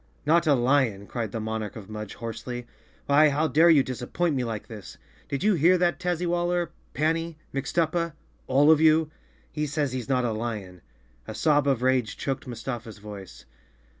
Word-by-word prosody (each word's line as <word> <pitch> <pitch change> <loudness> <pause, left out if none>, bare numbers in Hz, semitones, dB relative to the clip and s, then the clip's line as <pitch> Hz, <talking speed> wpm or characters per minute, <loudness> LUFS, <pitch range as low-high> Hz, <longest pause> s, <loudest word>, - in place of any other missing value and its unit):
"Not 165 +2 +3
a 145 - +5
lion!" 120 -5 +1
cried 115 -1 -4
the 115 - -3
Monarch 110 -1 -4
of 105 -4 -9
Mudge 105 -1 -7
hoarsely. 120 +2 -6 0.4
"Why, 150 +2 +5
how 150 +3 +1
dare 160 +5 +5
you 150 -5 +6
disappoint 130 +7 -2
me 130 - 0
like 110 -3 -4
this? 105 -4 -10 0.3
Did 140 +5 -2
you 210 0 +4
hear 175 +2 +4
that, 175 0 +1
Tazzywaller, 175 -1 0 0.3
Panny, 165 +1 0 0.2
Mixtuppa—all 155 -1 0
of 155 -1 +5
you? 155 0 +4 0.4
He 150 -1 -2
says 145 -2 -1
he's 130 0 -4
not 125 -2 +2
a 115 - 0
lion." 105 -5 -5 0.5
A 110 - -6
sob 145 0 +2
of 130 -3 +1
rage 130 -5 +1
choked 135 -2 -3
Mustafa's 120 -2 -6
voice. 100 - -10
135 Hz, 165 wpm, -26 LUFS, 115-160 Hz, 0.5 s, you